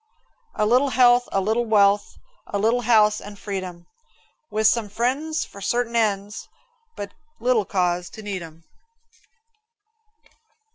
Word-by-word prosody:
A 215 Hz, -, +1 dB
little 250 Hz, +6 st, +3 dB
health, 245 Hz, -1 st, +4 dB
a 195 Hz, -, +1 dB
little 220 Hz, +5 st, 0 dB
wealth, 205 Hz, -1 st, +3 dB, 0.3 s
A 205 Hz, -, -3 dB
little 225 Hz, +4 st, +1 dB
house 215 Hz, -3 st, +3 dB
and 205 Hz, 0 st, -10 dB
freedom, 185 Hz, -4 st, -6 dB, 0.6 s
With 215 Hz, +1 st, -1 dB
some 220 Hz, -1 st, +3 dB
friends 270 Hz, +9 st, -1 dB
for 200 Hz, -, -13 dB
certain 235 Hz, +3 st, -1 dB
ends, 205 Hz, -2 st, -1 dB, 0.5 s
But 200 Hz, 0 st, -7 dB, 0.3 s
little 240 Hz, -3 st, +2 dB
cause 180 Hz, -2 st, -1 dB
to 220 Hz, -, -10 dB
need 200 Hz, -3 st, -4 dB
'em. 165 Hz, 0 st, -12 dB
210 Hz, 130 wpm, -23 LUFS, 200-240 Hz, 0.6 s, health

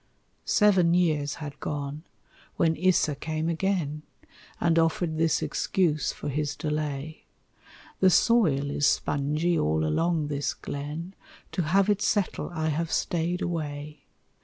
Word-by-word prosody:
Seven 185 Hz, -5 st, +4 dB
years 155 Hz, -5 st, +1 dB
had 145 Hz, -2 st, -8 dB
gone, 145 Hz, 0 st, -4 dB, 0.6 s
when 165 Hz, -1 st, +2 dB
Issa 175 Hz, -3 st, +2 dB
came 155 Hz, +2 st, -3 dB
again, 165 Hz, -3 st, -1 dB, 0.6 s
And 165 Hz, -1 st, +3 dB
offered 165 Hz, 0 st, 0 dB
this 165 Hz, -1 st, +2 dB
excuse 160 Hz, -5 st, 0 dB
for -, -, -7 dB
his 145 Hz, +1 st, -2 dB
delay, 150 Hz, -1 st, -4 dB, 0.7 s
"The 190 Hz, -, +6 dB
soil 165 Hz, -, +3 dB
is 145 Hz, 0 st, +2 dB
spongy 150 Hz, +5 st, +1 dB
all 80 Hz, +1 st, +1 dB
along 160 Hz, -, +1 dB
this 145 Hz, -1 st, -2 dB
glen 150 Hz, +6 st, -6 dB, 0.4 s
To -, -, -1 dB
have 185 Hz, +5 st, +2 dB
it 210 Hz, -1 st, +1 dB
settle 205 Hz, -3 st, 0 dB
I 160 Hz, -3 st, -2 dB
have 160 Hz, +2 st, -2 dB
stayed 175 Hz, +2 st, -1 dB
away. 150 Hz, -3 st, -5 dB
160 Hz, 130 wpm, -27 LUFS, 145-175 Hz, 0.7 s, The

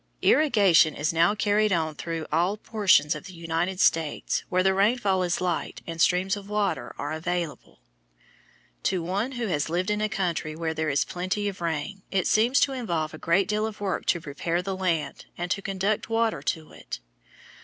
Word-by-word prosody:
Irrigation 200 Hz, -, +5 dB
is 155 Hz, +3 st, -1 dB
now 170 Hz, +5 st, +3 dB
carried 210 Hz, 0 st, +2 dB
on 160 Hz, -3 st, +1 dB
through 165 Hz, +1 st, -4 dB
all 175 Hz, +6 st, +1 dB
portions 200 Hz, -8 st, +3 dB
of 150 Hz, 0 st, -8 dB
the 185 Hz, -2 st, -10 dB
United 170 Hz, +3 st, -2 dB
States 160 Hz, -5 st, +1 dB
where 185 Hz, 0 st, +2 dB
the 190 Hz, 0 st, +3 dB
rainfall 200 Hz, -1 st, +2 dB
is 175 Hz, -1 st, 0 dB
light 180 Hz, -1 st, -2 dB
and 165 Hz, -1 st, -4 dB
streams 185 Hz, +3 st, +3 dB
of 200 Hz, 0 st, -9 dB
water 210 Hz, -1 st, -1 dB
are 145 Hz, -, -4 dB
available. 170 Hz, 0 st, -4 dB, 1.0 s
To 180 Hz, -3 st, 0 dB
one 200 Hz, +9 st, -2 dB
who 240 Hz, -2 st, -2 dB
has 155 Hz, -7 st, -1 dB
lived 180 Hz, +5 st, 0 dB
in 210 Hz, 0 st, 0 dB
a 215 Hz, -, +1 dB
country 175 Hz, -6 st, -2 dB
where 160 Hz, 0 st, -2 dB
there 160 Hz, 0 st, -1 dB
is 140 Hz, 0 st, +1 dB
plenty 185 Hz, +3 st, -2 dB
of 190 Hz, -3 st, -5 dB
rain, 170 Hz, +4 st, -3 dB
it 190 Hz, -3 st, 0 dB
seems 235 Hz, +5 st, +3 dB
to 275 Hz, -, +3 dB
involve 170 Hz, -12 st, -2 dB
a 155 Hz, -, -9 dB
great 185 Hz, +4 st, +2 dB
deal 215 Hz, +1 st, 0 dB
of 220 Hz, -, -8 dB
work 200 Hz, -2 st, -2 dB
to 175 Hz, -, +2 dB
prepare 165 Hz, +4 st, -2 dB
the 195 Hz, 0 st, -3 dB
land 175 Hz, -5 st, -2 dB
and 175 Hz, 0 st, -3 dB
to 200 Hz, -, 0 dB
conduct 195 Hz, +2 st, -1 dB
water 225 Hz, -8 st, +1 dB
to 155 Hz, +2 st, -3 dB
it. -, -, -8 dB
185 Hz, 190 wpm, -26 LUFS, 165-205 Hz, 1.0 s, Irrigation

